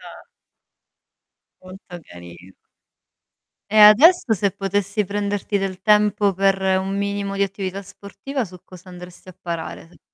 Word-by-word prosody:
Ah. -, -, -13 dB, 1.4 s
Molto 185 Hz, +1 st, -13 dB, 0.2 s
carin 90 Hz, +1 st, -14 dB, 1.2 s
E 215 Hz, -, +1 dB
adesso 235 Hz, -, +6 dB
se 200 Hz, 0 st, 0 dB
potessi 200 Hz, +2 st, -2 dB
prenderti 205 Hz, 0 st, -3 dB
del 190 Hz, -1 st, -5 dB
tempo 210 Hz, -1 st, +2 dB
per 195 Hz, +1 st, +1 dB, 0.2 s
un 195 Hz, +1 st, -4 dB
minimo 200 Hz, 0 st, -3 dB
di 200 Hz, -, +1 dB
attività 195 Hz, 0 st, -5 dB
sportiva 200 Hz, +7 st, -7 dB
su 180 Hz, -2 st, -11 dB
cosa 185 Hz, 0 st, -15 dB
andresti 180 Hz, +1 st, -13 dB
a 180 Hz, -, -14 dB
parare 165 Hz, -1 st, -7 dB
se -, -, -21 dB
195 Hz, 130 wpm, -20 LUFS, 185-205 Hz, 1.4 s, adesso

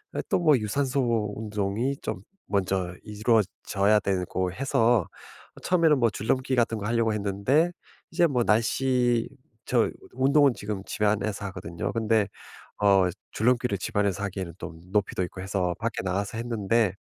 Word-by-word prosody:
에 -, -, 0 dB
또 -, -, +2 dB
뭐 155 Hz, -5 st, +5 dB
유산소 120 Hz, -2 st, 0 dB
운동이 105 Hz, +4 st, -2 dB
좀 -, -, -4 dB, 0.3 s
먼저 95 Hz, -3 st, 0 dB
이루어져야 105 Hz, -1 st, +1 dB
되고 95 Hz, -1 st, -1 dB
해서 115 Hz, -3 st, +2 dB, 0.6 s
처음에는 165 Hz, -5 st, +3 dB
뭐 120 Hz, -2 st, +4 dB
줄넘기 130 Hz, +6 st, 0 dB
같은 115 Hz, -2 st, +1 dB
거 100 Hz, -, -5 dB
하려고 115 Hz, -1 st, +1 dB
했는데 105 Hz, -, +1 dB, 0.4 s
이제 170 Hz, -, +3 dB
뭐 125 Hz, -5 st, +1 dB
날씨 120 Hz, +1 st, +2 dB, 0.4 s
저 120 Hz, -3 st, +2 dB, 0.2 s
운동은 140 Hz, +1 st, +4 dB
지금 100 Hz, -2 st, -5 dB
집안에서 105 Hz, -1 st, -1 dB
하거든요. 85 Hz, -3 st, -5 dB
근데 110 Hz, -2 st, +2 dB, 0.5 s
어 100 Hz, -2 st, +5 dB, 0.2 s
줄넘기를 120 Hz, -1 st, +1 dB
집안에서 100 Hz, -1 st, -1 dB
하기에는 95 Hz, -3 st, -4 dB
또 80 Hz, -, -7 dB, 0.2 s
높이도 100 Hz, -2 st, 0 dB
있고 90 Hz, +1 st, -6 dB
해서 95 Hz, -2 st, -1 dB
밖에 115 Hz, -1 st, -2 dB
나가서 100 Hz, +3 st, -2 dB
했는데 115 Hz, -3 st, +1 dB
110 Hz, 310 characters per minute, -26 LUFS, 100-120 Hz, 0.6 s, 뭐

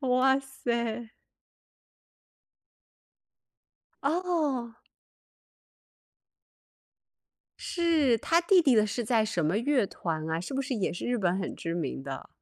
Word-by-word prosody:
哇 265 Hz, 0 st, +3 dB
塞！ 235 Hz, -4 st, -3 dB, 2.9 s
哦。 295 Hz, -8 st, -1 dB, 2.8 s
是， 320 Hz, -8 st, +2 dB
他 335 Hz, +6 st, +3 dB
弟 360 Hz, +1 st, +5 dB
弟 270 Hz, -6 st, +4 dB
的 215 Hz, -1 st, +5 dB
是 225 Hz, +3 st, -3 dB
在 220 Hz, -1 st, +2 dB
什 180 Hz, -6 st, -1 dB
么 160 Hz, +6 st, +1 dB
乐 250 Hz, -1 st, +2 dB
团 160 Hz, -3 st, -4 dB
啊？ 160 Hz, +1 st, -1 dB
是 180 Hz, +10 st, -6 dB
不 270 Hz, -, 0 dB
是 270 Hz, -1 st, -3 dB
也 205 Hz, -, -1 dB
是 175 Hz, -, -5 dB
日 245 Hz, 0 st, +1 dB
本 185 Hz, -3 st, +1 dB
很 190 Hz, -, -4 dB
知 165 Hz, -, -4 dB
名 150 Hz, -5 st, -3 dB
的？ 135 Hz, -1 st, -7 dB
240 Hz, 125 characters per minute, -28 LUFS, 190-275 Hz, 2.9 s, 弟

